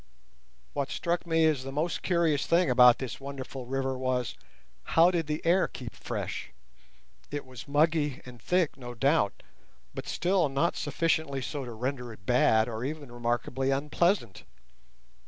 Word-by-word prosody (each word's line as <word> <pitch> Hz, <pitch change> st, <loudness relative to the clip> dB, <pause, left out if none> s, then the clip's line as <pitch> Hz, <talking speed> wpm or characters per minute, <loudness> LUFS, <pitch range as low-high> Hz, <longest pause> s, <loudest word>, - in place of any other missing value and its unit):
What 140 Hz, -1 st, -2 dB
struck 175 Hz, 0 st, -2 dB
me 165 Hz, -1 st, +3 dB
as 155 Hz, -4 st, +2 dB
the 135 Hz, -, -6 dB
most 155 Hz, +5 st, -1 dB
curious 170 Hz, -5 st, +1 dB
thing 170 Hz, -4 st, +3 dB
about 125 Hz, -1 st, +7 dB
this 130 Hz, -3 st, -5 dB
wonderful 135 Hz, -2 st, -7 dB
river 135 Hz, 0 st, -1 dB
was: 125 Hz, -4 st, -1 dB, 0.6 s
how 170 Hz, +2 st, +7 dB
did 165 Hz, -4 st, -1 dB
the 150 Hz, +1 st, -3 dB
air 180 Hz, +3 st, +4 dB
keep 120 Hz, -1 st, -8 dB
fresh? -, -, -5 dB, 0.8 s
It 145 Hz, -1 st, -4 dB
was 130 Hz, -1 st, -10 dB
muggy 150 Hz, -1 st, +2 dB
and 125 Hz, -2 st, -12 dB
thick, 175 Hz, -2 st, +1 dB
no 120 Hz, -2 st, -8 dB
doubt, 135 Hz, -3 st, +1 dB, 0.5 s
but -, -, -6 dB
still 180 Hz, -3 st, +1 dB
not 140 Hz, +5 st, +1 dB
sufficiently 150 Hz, -1 st, 0 dB
so 140 Hz, -1 st, -4 dB
to 120 Hz, -, -7 dB
render 125 Hz, +1 st, -3 dB
it 105 Hz, -3 st, -14 dB
bad 110 Hz, -2 st, +4 dB
or 115 Hz, -1 st, -4 dB
even 145 Hz, -1 st, -5 dB
remarkably 120 Hz, +2 st, -1 dB
unpleasant. 150 Hz, -, 0 dB
140 Hz, 155 wpm, -29 LUFS, 125-160 Hz, 0.8 s, about